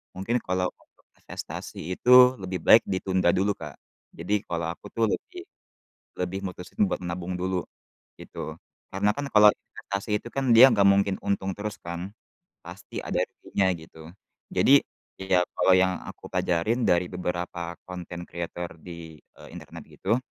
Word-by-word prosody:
mungkin 115 Hz, +6 st, -1 dB
kalau 90 Hz, -2 st, -1 dB
untuk -, -, -30 dB, 0.2 s
investasi -, -, -7 dB
itu 125 Hz, +3 st, +6 dB
lebih 95 Hz, -1 st, -4 dB
baik 110 Hz, -, +7 dB
ditunda 95 Hz, -2 st, +1 dB
dulu, 100 Hz, +2 st, +2 dB
Kak. 75 Hz, -4 st, -8 dB, 0.4 s
Jadi 105 Hz, 0 st, -1 dB
kalau 85 Hz, -1 st, -2 dB
aku -, -, -13 dB
tuh 115 Hz, -1 st, +3 dB
lebih 360 Hz, -1 st, -5 dB, 0.7 s
lebih 90 Hz, +1 st, -2 dB
mutusin 90 Hz, -, -6 dB
buat -, -, -3 dB
nabung 90 Hz, +1 st, -4 dB
dulu, 90 Hz, -1 st, -1 dB, 0.6 s
gitu, -, -, -7 dB, 0.4 s
karena 100 Hz, +2 st, +1 dB
kan 145 Hz, -, -2 dB
kalau 105 Hz, 0 st, +8 dB
investasi 100 Hz, +1 st, -4 dB
itu -, -, -10 dB
kan 135 Hz, -3 st, +1 dB
dia 130 Hz, +4 st, +10 dB
nggak 100 Hz, -2 st, +3 dB
mungkin 100 Hz, 0 st, +3 dB
untung 95 Hz, -1 st, 0 dB
terus 105 Hz, 0 st, -5 dB
kan, 85 Hz, +3 st, -6 dB, 0.5 s
pasti -, -, -8 dB
ada -, -, -1 dB
ruginya, 95 Hz, -1 st, -1 dB
gitu. 80 Hz, 0 st, -13 dB, 0.4 s
Jadi, -, -, +6 dB, 0.4 s
ya 95 Hz, -1 st, +2 dB
kalau 95 Hz, -, +5 dB
yang 95 Hz, 0 st, +2 dB
aku -, -, -10 dB
pelajarin 105 Hz, +8 st, 0 dB
dari 90 Hz, 0 st, +3 dB
beberapa 85 Hz, -1 st, -4 dB
content 90 Hz, -1 st, -7 dB
creator 85 Hz, 0 st, -5 dB
di, 85 Hz, -3 st, -10 dB
eee, -, -, -17 dB
internet -, -, -10 dB
gitu, 115 Hz, -, 0 dB
95 Hz, 150 wpm, -26 LUFS, 85-105 Hz, 0.7 s, dia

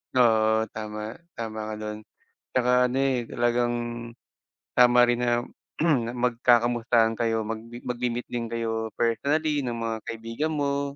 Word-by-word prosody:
Oo, 110 Hz, -2 st, +4 dB
tama. 105 Hz, +2 st, -6 dB, 0.2 s
Tama 110 Hz, -1 st, -5 dB
ka 110 Hz, -, -4 dB
do'n, 105 Hz, 0 st, -5 dB, 0.6 s
tsaka 125 Hz, -1 st, +3 dB, 0.2 s
ano, 125 Hz, -, -2 dB
eh, 125 Hz, -4 st, 0 dB
talagang 120 Hz, 0 st, +1 dB, 1.0 s
tama 125 Hz, 0 st, +6 dB
rin 120 Hz, 0 st, +1 dB
na 120 Hz, -1 st, +1 dB, 0.8 s
magkakamustahan 120 Hz, -1 st, +3 dB
kayo 115 Hz, -1 st, +1 dB
mag 110 Hz, +1 st, -3 dB, 0.3 s
magmi-meet 120 Hz, 0 st, -2 dB
din 120 Hz, -1 st, -2 dB
kayo 115 Hz, -1 st, -3 dB
personally 145 Hz, +6 st, +1 dB
ng 120 Hz, -, -2 dB
mga 115 Hz, -1 st, -2 dB
kaibigan 115 Hz, +7 st, -3 dB
mo 140 Hz, -1 st, -1 dB
120 Hz, 125 wpm, -26 LUFS, 115-125 Hz, 1.0 s, tama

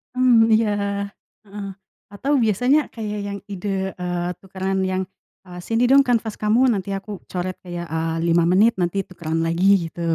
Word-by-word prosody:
Mmm, 250 Hz, -3 st, +5 dB
iya, 220 Hz, 0 st, +3 dB, 0.7 s
heeh, 205 Hz, -1 st, -7 dB, 0.5 s
atau 265 Hz, +8 st, -2 dB
biasanya 245 Hz, +7 st, +3 dB
kayak 210 Hz, -2 st, -4 dB
yang 200 Hz, 0 st, -5 dB
ide, 200 Hz, +1 st, -4 dB, 0.3 s
eee, 175 Hz, -1 st, -2 dB
tukaran 190 Hz, 0 st, -3 dB
yang, 185 Hz, 0 st, 0 dB, 0.4 s
eee, 180 Hz, -1 st, -10 dB
"Sini 225 Hz, +1 st, +1 dB
dong 275 Hz, +1 st, +6 dB
kanvas 230 Hz, -4 st, 0 dB
kamu, 215 Hz, +2 st, +2 dB
nanti 195 Hz, -2 st, -3 dB
aku 195 Hz, +1 st, -5 dB
coret, 185 Hz, 0 st, -4 dB
kayak, 175 Hz, -1 st, -5 dB
eee, 160 Hz, 0 st, -1 dB
5 170 Hz, 0 st, +3 dB
menit, 200 Hz, +7 st, +4 dB
nanti 180 Hz, +2 st, 0 dB
tukeran 165 Hz, -2 st, -3 dB
lagi," 165 Hz, +3 st, 0 dB, 0.2 s
gitu. 170 Hz, -, -9 dB
195 Hz, 160 wpm, -22 LUFS, 175-220 Hz, 0.7 s, dong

